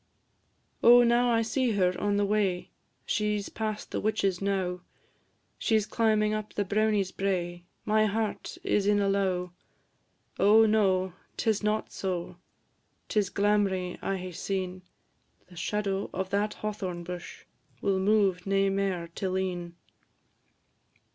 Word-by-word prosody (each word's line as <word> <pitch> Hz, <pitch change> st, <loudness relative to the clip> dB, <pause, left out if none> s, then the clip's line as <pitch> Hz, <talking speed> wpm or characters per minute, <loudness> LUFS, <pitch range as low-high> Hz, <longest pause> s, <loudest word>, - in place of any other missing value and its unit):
O 245 Hz, +1 st, +8 dB
now 240 Hz, +1 st, +3 dB
I 230 Hz, -1 st, +3 dB
see 230 Hz, +1 st, 0 dB
her 185 Hz, -2 st, +2 dB
on 205 Hz, 0 st, +1 dB
the 205 Hz, -, +2 dB
way! 200 Hz, -3 st, 0 dB, 0.3 s
She 210 Hz, 0 st, 0 dB
's 200 Hz, -, -5 dB
past 215 Hz, -1 st, -4 dB
the -, -, -1 dB
witch's 200 Hz, -4 st, 0 dB
knowe; 190 Hz, -2 st, -1 dB, 0.8 s
She 220 Hz, -, +2 dB
's 215 Hz, -, 0 dB
climbing 215 Hz, -2 st, +2 dB
up 215 Hz, 0 st, -4 dB
the 205 Hz, -, 0 dB
brownie's 210 Hz, -2 st, +1 dB
brae 175 Hz, -3 st, -2 dB, 0.2 s
My 215 Hz, 0 st, +3 dB
heart 215 Hz, +1 st, -3 dB
is 205 Hz, -1 st, +1 dB
in 205 Hz, 0 st, +4 dB
a 200 Hz, -, +1 dB
lowe. 185 Hz, -2 st, 0 dB, 0.9 s
Oh, 220 Hz, +2 st, +6 dB
no! 190 Hz, -4 st, +2 dB, 0.2 s
'tis 220 Hz, -3 st, +1 dB
not 210 Hz, +1 st, -1 dB
so, 180 Hz, -3 st, -4 dB, 0.7 s
'Tis 205 Hz, -3 st, +1 dB
glamrie 200 Hz, -2 st, +1 dB
I 195 Hz, -, -1 dB
hae 185 Hz, 0 st, -6 dB
seen; 185 Hz, +1 st, -3 dB, 0.7 s
The 180 Hz, -, -15 dB
shadow 195 Hz, +2 st, -2 dB
o' 190 Hz, -, 0 dB
that 200 Hz, +3 st, -1 dB
hawthorn 190 Hz, -5 st, -4 dB
bush 180 Hz, 0 st, -8 dB, 0.3 s
Will 195 Hz, -1 st, +1 dB
move 195 Hz, -2 st, +2 dB
nae 195 Hz, 0 st, +2 dB
mair 195 Hz, -3 st, -1 dB
till 185 Hz, 0 st, -2 dB
e'en. 175 Hz, -2 st, -3 dB
200 Hz, 140 wpm, -28 LUFS, 185-215 Hz, 0.9 s, O